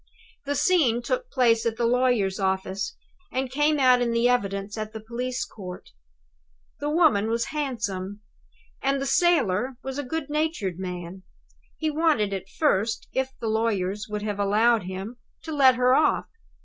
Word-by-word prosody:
The 285 +1 -1
scene 270 -10 +3
took - - -2
place 235 - +3
at 230 -1 -1
the 235 - +1
lawyer's 235 -5 +2
office, 190 +1 -1 0.4
and 260 0 -2
came 295 +3 +2
out 255 -2 +5
in 235 -1 +1
the 230 +1 +3
evidence 200 -4 -1
at 215 0 -5
the 220 - -6
police 245 +3 -3
court. 180 -4 -10 0.9
The 290 - -2
woman 300 - +3
was 230 +1 0
handsome, 210 -9 -3 0.6
and 275 0 +1
the 275 - -2
sailor 265 - +2
was 265 +1 -4
a - - -2
good 300 +2 -4
natured 295 - -2
man. 180 0 -6 0.6
He 315 -1 -1
wanted, 300 -10 +2
at 190 0 -5
first, 220 -7 0
if 265 0 -2
the 230 - -3
lawyers 210 -3 -1
would 210 0 -4
have 205 -1 -3
allowed 215 +1 +3
him, 190 +6 -6 0.3
to 320 - -6
let 265 -3 +6
her 250 0 +3
off. 300 +3 +3
235 Hz, 160 wpm, -25 LUFS, 200-270 Hz, 0.9 s, let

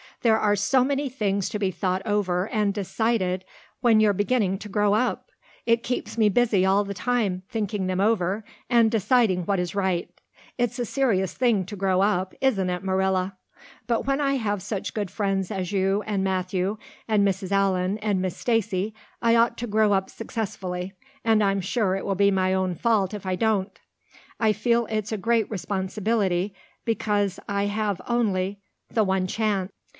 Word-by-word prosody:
There 220 -2 +4
are 205 -1 +3
so 225 +6 +3
many 280 +1 0
things 200 -6 -1
to 210 - -3
be 195 -2 +1
thought 185 +1 -1
over 195 -3 0
and 210 -4 +1
decided 195 -2 0 0.4
when 230 -4 +5
you're 215 -1 +4
beginning 205 -1 +1
to 210 - -8
grow 205 0 +2
up. 245 +3 -1 0.4
It 230 0 +3
keeps 230 -3 -3
me 215 -2 +4
busy 205 -3 +3
all 195 +2 +3
the 200 0 -5
time 200 -3 0
thinking 210 -3 -2
them 185 0 -1
over 200 -1 +1 0.3
and 235 -2 +5
deciding 220 -4 +2
what 195 0 +1
is 180 -1 -2
right. 190 -3 0 0.5
It's 245 0 0
a 245 - -1
serious 210 -8 +1
thing 230 -7 +2
to 205 - -6
grow 190 -1 +1
up, 190 -2 +1
isn't 205 -9 +2
it, 180 0 -3
Marilla? 190 0 0 0.5
But 235 -2 0
when 275 +2 +1
I 275 -1 +2
have 205 -6 -1
such 200 -1 -4
good 205 -3 -2
friends 195 -2 -1
as 190 -3 -3
you 195 +1 +1
and 200 -3 0
Matthew 185 +1 -1 0.3
and 210 -2 +3
Mrs. 190 0 -2
Allan 195 0 +1
and 205 -3 0
Miss 185 -1 -3
Stacy 215 -3 0 0.3
I 230 0 +4
ought 230 +1 +3
to 240 - -3
grow 215 0 +3
up 190 -1 0
successfully, 190 -5 -5 0.3
and 220 -2 +3
I'm 195 -1 +1
sure 190 0 0
it 195 - -4
will 195 - 0
be 200 +1 +4
my 185 -1 +1
own 185 -1 0
fault 215 -2 +1
if 205 -2 -6
I 185 -1 0
don't. 205 -2 0 0.6
I 220 -2 +3
feel 235 +2 +1
it's 215 -1 -2
a 220 - -1
great 230 +1 +1
responsibility 195 -1 -1 0.3
because 205 -4 0
I 200 0 0
have 205 -2 -1
only 200 -5 0 0.3
the 220 - +2
one 190 -1 +1
chance. 200 -2 -1
205 Hz, 180 wpm, -25 LUFS, 190-225 Hz, 0.6 s, when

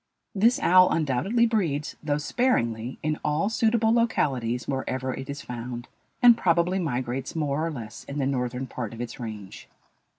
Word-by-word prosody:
This 225 +4 +4
owl 185 +1 +6
undoubtedly 160 - +1
breeds, 170 -11 -1
though 145 -1 0
sparingly, 130 - 0
in 155 0 -1
all 155 +7 +1
suitable 225 0 +2
localities 130 - 0
wherever 130 -1 -2
it 135 +2 -7
is 140 0 -5
found, 120 0 -6 0.4
and 240 -1 +9
probably 175 -1 +2
migrates 130 -4 -3
more 150 -1 -1
or 165 - 0
less 115 -8 -8
in 140 - -6
the 140 - 0
northern 125 -1 -2
part 120 -3 -6
of 115 - -7
its 120 +3 -6
range. 110 -5 -8
140 Hz, 160 wpm, -26 LUFS, 125-185 Hz, 0.4 s, and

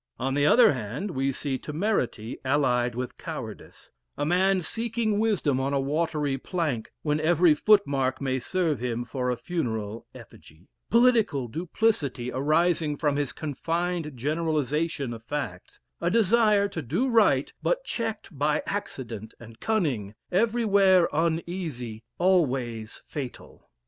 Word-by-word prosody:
On 135 +2 -1
the 145 +1 +3
other 230 0 +6
hand, 130 - -4
we 135 -2 0
see 135 0 -3
temerity 150 - -2
allied 125 -3 +1
with 125 0 -4
cowardice - - -8 0.3
a - - -1
man 185 +3 +3
seeking 225 +2 -1
wisdom 195 -12 +1
on 135 +1 -1
a - - +2
watery 145 -1 -1
plank, 150 - -2
when 150 -1 +1
every 165 +1 +4
footmark 140 -9 +3
may 130 -1 -1
serve 165 - -1
him 120 -1 -2
for 125 +1 -2
a 125 - +1
funeral 115 -9 -3
effigy; 80 +5 -15 0.2
political 225 - +3
duplicity 155 - -1
arising 155 +3 +1
from 145 -3 +1
his 145 -2 -1
confined 165 +2 -2
generalization 150 0 -1
of 115 -1 -9
facts; 115 -9 -5 0.2
a 170 - +1
desire 215 0 +4
to 185 -5 -5
do 165 - 0
right, 205 - +3
but - - 0
checked 225 - -4
by 150 +2 +1
accident 120 - -5
and 115 -1 -13
cunning 135 - -1 0.2
everywhere 200 -3 +4
uneasy 160 - -2 0.2
always 130 - 0
fatal. 135 -5 -8
150 Hz, 130 wpm, -26 LUFS, 130-185 Hz, 0.3 s, other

